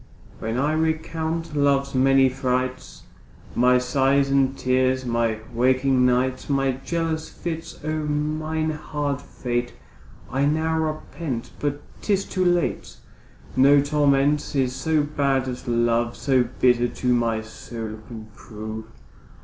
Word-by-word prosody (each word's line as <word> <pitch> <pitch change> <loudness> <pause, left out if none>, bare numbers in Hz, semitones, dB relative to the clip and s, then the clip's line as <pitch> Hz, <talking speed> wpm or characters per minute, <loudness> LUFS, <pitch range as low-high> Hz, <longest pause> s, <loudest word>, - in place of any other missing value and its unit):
When 110 +2 -3
I 145 +4 +1
recount 160 0 -2
love's 140 -1 +2
many 135 0 +5
frights, 130 - -2 0.5
My 125 +1 +4
sighs 135 +2 +2
and 135 -1 +2
tears, 130 0 +1
my 115 -2 0 0.2
waking 130 +1 +3
nights, 125 +2 0
My 135 -1 +2
jealous 165 -2 -2
fits; 165 -1 -6
O 155 0 -1
mine 155 +1 -1
hard 145 -2 -3
fate 120 -2 -3 0.6
I 135 +2 +1
now 160 +2 +1
repent, 155 -4 -4
but 145 0 -2 0.2
'tis 200 -2 +1
too 185 - -1
late. 175 -1 0 0.6
No 140 +2 +6
torment 145 0 +2
is 130 -2 +1
so 150 +3 +1
bad 140 -3 0
as 125 0 -6
love, 120 0 +1
So 130 -3 +2
bitter 120 -1 +4
to 125 +1 0
my 115 -2 +1
soul 110 0 -7
can 110 -2 -8
prove. 110 0 -7
135 Hz, 125 wpm, -24 LUFS, 125-150 Hz, 0.6 s, No